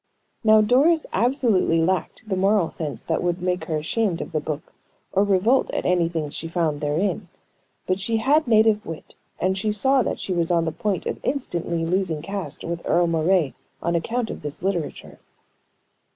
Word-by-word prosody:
Now, 215 -1 +6
Doris 285 +9 +3
absolutely 230 - +2
lacked 185 +6 -1
the 195 - -1
moral 195 -2 +2
sense 155 -3 -5
that 160 - -1
would 175 0 0
make 180 +1 -1
her 160 -3 -1
ashamed 175 +3 -1
of - - -6
the 155 - 0
book, 150 0 -6 0.4
or 195 - +4
revolt 205 +6 +3
at - - -3
anything 170 -4 0
she 165 - -5
found 165 -3 -1
therein. 175 +6 -1 0.6
But 185 +1 0
she 225 +3 0
had 285 +6 +3
native 220 -2 +4
wit, 165 -1 -8 0.3
and 190 +1 +1
she 210 +2 -1
saw 265 +6 +2
that - - -2
she 190 - -3
was 170 -2 0
on 170 -2 +2
the 160 - -1
point 190 +4 -2
of - - -3
instantly 170 - -2
losing 170 -3 -1
caste 195 +1 -5
with 170 0 -4
Earle 175 +1 +3
Moray 165 -1 +2 0.3
on 170 - -1
account 230 +7 -1
of - - -7
this 150 +2 -6
literature. 180 -6 -3
185 Hz, 180 wpm, -23 LUFS, 165-215 Hz, 0.6 s, Now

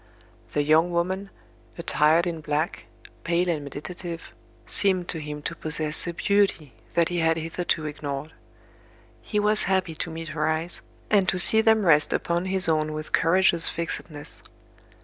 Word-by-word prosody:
The 145 - +1
young 160 +4 +3
woman, 185 +3 -2 0.5
attired 165 0 +2
in 165 -2 -4
black, 150 +2 -3 0.4
pale 170 +2 0
and 155 -4 -2
meditative, 165 +4 -8 0.3
seemed 185 -3 0
to 165 - -3
him 150 -1 -7
to - - -4
possess 155 +1 -1
a 170 - -3
beauty 195 - 0 0.2
that 170 -1 +2
he 175 -1 -2
had 165 0 +2
hitherto 165 0 -2
ignored. 145 0 -6 0.9
He 210 - -2
was 210 +1 +2
happy 185 -3 0
to 160 - -5
meet 165 0 -7
her 150 -1 -2
eyes, 160 +2 -3 0.3
and 200 -3 +3
to 190 - 0
see 220 +5 +6
them 220 -2 +3
rest 150 -3 +4
upon 170 +1 -1
his 190 -1 +1
own 155 -1 0
with 155 0 -7
courageous 170 0 +6
fixedness. 160 -2 -5
165 Hz, 155 wpm, -25 LUFS, 155-180 Hz, 0.9 s, see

